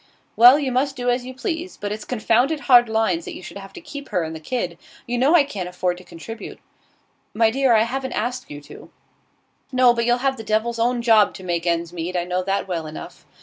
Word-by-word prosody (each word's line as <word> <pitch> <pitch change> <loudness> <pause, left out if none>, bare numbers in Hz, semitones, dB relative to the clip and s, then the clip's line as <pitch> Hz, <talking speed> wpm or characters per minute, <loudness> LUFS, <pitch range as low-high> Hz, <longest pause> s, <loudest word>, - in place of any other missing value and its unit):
'Well, 245 +4 +8
you 280 -3 -2
must 270 +2 0
do 245 -1 0
as 245 +1 -2
you 260 - -8
please. 335 +5 -4
But 205 0 -4
it's 210 0 -5
confounded 250 +5 +1
hard 245 -4 +5
lines 220 -7 0
that - - -7
you - - -10
should 200 - -9
have 195 0 -11
to - - -9
keep 285 -3 -9
her 180 - 0
and 160 0 -5
the - - -7
kid. 175 -2 -4 0.3
You 240 0 -2
know 280 +7 +4
I 320 - +6
can't 195 -10 -5
afford 180 0 -2
to - - -14
contribute.' 220 +7 -9 0.8
'My 225 0 +3
dear, 265 -1 +3
I 220 - +5
haven't 260 +2 -4
asked 250 +3 -3
you 145 0 -8
to.' 145 - -13 0.8
'No, 255 -2 +5
but 235 0 -1
you'll 240 0 +3
have 270 -1 +1
the 225 - -7
devil's 220 +2 -1
own 240 +1 +1
job 220 -3 +4
to 190 - -10
make 175 -1 -2
ends 170 0 -1
meet; 175 +1 -3
I 175 - 0
know 180 +1 -2
that 195 +2 -2
well 165 -4 -3
enough. 155 - -10
225 Hz, 235 wpm, -22 LUFS, 180-255 Hz, 0.8 s, Well